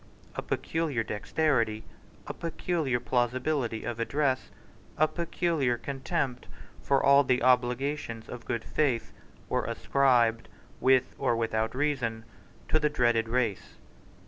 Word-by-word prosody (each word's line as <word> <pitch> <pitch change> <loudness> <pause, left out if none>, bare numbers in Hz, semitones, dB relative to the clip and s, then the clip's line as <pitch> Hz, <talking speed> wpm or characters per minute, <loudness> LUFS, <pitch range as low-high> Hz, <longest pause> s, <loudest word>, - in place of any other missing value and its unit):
A - - -2
peculiar 155 -8 -1
dexterity, 115 0 0 0.4
a - - -5
peculiar 165 -6 -1
plausibility 125 0 0
of 120 -1 -4
address, 135 +2 0 0.5
a 155 - +4
peculiar 165 -7 0
contempt 135 0 -3 0.3
for 135 -1 +2
all 140 +1 +6
the 125 -2 +1
obligations 125 -1 +1
of 120 -2 -8
good 115 0 -2
faith, 130 -7 0 0.3
were - - 0
ascribed, 120 -4 +2 0.3
with 130 0 +3
or 130 -4 +2
without 110 0 -1
reason, 125 -6 -1 0.4
to 155 - +3
the 150 0 +2
dreaded 120 -5 +2
race. 115 -4 -1
125 Hz, 120 wpm, -29 LUFS, 115-145 Hz, 0.5 s, all